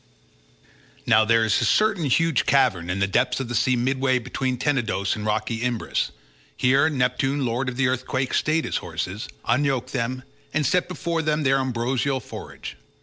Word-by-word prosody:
Now 110 Hz, 0 st, +5 dB
there 115 Hz, 0 st, +3 dB
is 110 Hz, -, +2 dB
a -, -, +2 dB
certain 200 Hz, -, +2 dB
huge 160 Hz, +2 st, +2 dB
cavern 120 Hz, -11 st, +2 dB
in 90 Hz, -, -1 dB
the 100 Hz, -, +2 dB
depths 125 Hz, +8 st, +1 dB
of 130 Hz, -3 st, -4 dB
the -, -, -3 dB
sea 125 Hz, +2 st, +2 dB
midway 130 Hz, +1 st, +1 dB
between 130 Hz, +1 st, -2 dB
Tenedos 115 Hz, -8 st, 0 dB
and 105 Hz, -1 st, -5 dB
rocky 110 Hz, +2 st, -1 dB
Imbrus; 120 Hz, -2 st, -1 dB, 0.5 s
here 135 Hz, +5 st, +3 dB
Neptune 135 Hz, 0 st, 0 dB
lord 125 Hz, +2 st, -1 dB
of 125 Hz, -, -7 dB
the 135 Hz, -1 st, +2 dB
earthquake 130 Hz, +1 st, -1 dB
stayed 155 Hz, +1 st, +1 dB
his -, -, -1 dB
horses, 90 Hz, +7 st, -5 dB, 0.2 s
unyoked 135 Hz, -1 st, 0 dB
them, 130 Hz, 0 st, -2 dB, 0.3 s
and 155 Hz, -1 st, +1 dB
set 180 Hz, +7 st, +2 dB
before 170 Hz, -2 st, -2 dB
them 155 Hz, -1 st, 0 dB
their 135 Hz, 0 st, +3 dB
ambrosial 130 Hz, +1 st, -1 dB
forage. 115 Hz, -, -9 dB
130 Hz, 170 wpm, -24 LUFS, 115-140 Hz, 0.5 s, Now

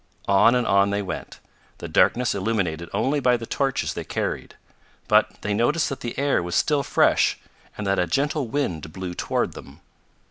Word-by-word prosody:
On 100 Hz, +5 st, +5 dB
and 125 Hz, -1 st, +1 dB
on 100 Hz, +1 st, +3 dB
they 100 Hz, 0 st, -1 dB
went, 95 Hz, -, -6 dB, 0.4 s
the -, -, -7 dB
darkness 125 Hz, 0 st, +2 dB
illuminated 95 Hz, -6 st, -2 dB
only 145 Hz, +2 st, 0 dB
by 125 Hz, -2 st, +3 dB
the 115 Hz, -, -7 dB
torches 135 Hz, +2 st, -1 dB
they -, -, -5 dB
carried. -, -, -4 dB, 0.5 s
But -, -, +3 dB
they 105 Hz, -, -1 dB
noticed 135 Hz, +10 st, +1 dB
that 135 Hz, -, -5 dB
the 120 Hz, -, -6 dB
air 140 Hz, -6 st, +1 dB
was 85 Hz, 0 st, -4 dB
still 150 Hz, -2 st, +2 dB
fresh, -, -, +2 dB, 0.4 s
and 105 Hz, -, -4 dB
that 95 Hz, 0 st, +1 dB
a 90 Hz, -, +1 dB
gentle 140 Hz, -, 0 dB
wind 90 Hz, -, -3 dB
blew 95 Hz, -2 st, -5 dB
toward -, -, -1 dB
them. 70 Hz, +5 st, -13 dB
110 Hz, 180 wpm, -24 LUFS, 95-135 Hz, 0.5 s, On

